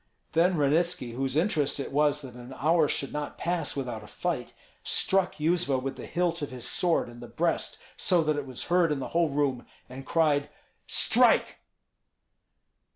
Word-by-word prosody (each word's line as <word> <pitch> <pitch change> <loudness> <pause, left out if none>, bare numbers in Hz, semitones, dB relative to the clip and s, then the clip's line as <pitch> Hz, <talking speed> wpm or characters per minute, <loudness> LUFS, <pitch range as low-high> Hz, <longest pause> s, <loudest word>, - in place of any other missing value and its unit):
Then 170 +2 +3
Ranitski, 150 -2 +1
whose 135 +2 -2
interest 155 -6 +1
it 140 - -4
was 150 +1 +2
that 130 -2 -9
an 125 +2 -10
hour 160 +1 +3
should 140 - -2
not 150 0 -4
pass 175 0 -2
without 125 -6 -4
a - - -12
fight, - - -3 0.3
struck 190 -1 +1
Yuzva 160 -3 +1
with 130 +1 -4
the - - -8
hilt 170 -1 -1
of 145 - -3
his 125 -2 -7
sword 175 -2 +1
in 120 0 -11
the 120 - -9
breast, 165 +6 -1 0.2
so 175 -3 +3
that 155 -1 +1
it 145 -2 -4
was 130 -2 -6
heard 175 -2 +2
in 150 - 0
the 135 - -5
whole 170 -1 +2
room, 140 -3 0 0.2
and 130 +2 -9
cried, 145 -1 +1 0.4
"Strike!" - - +4
150 Hz, 175 wpm, -28 LUFS, 135-170 Hz, 0.4 s, Strike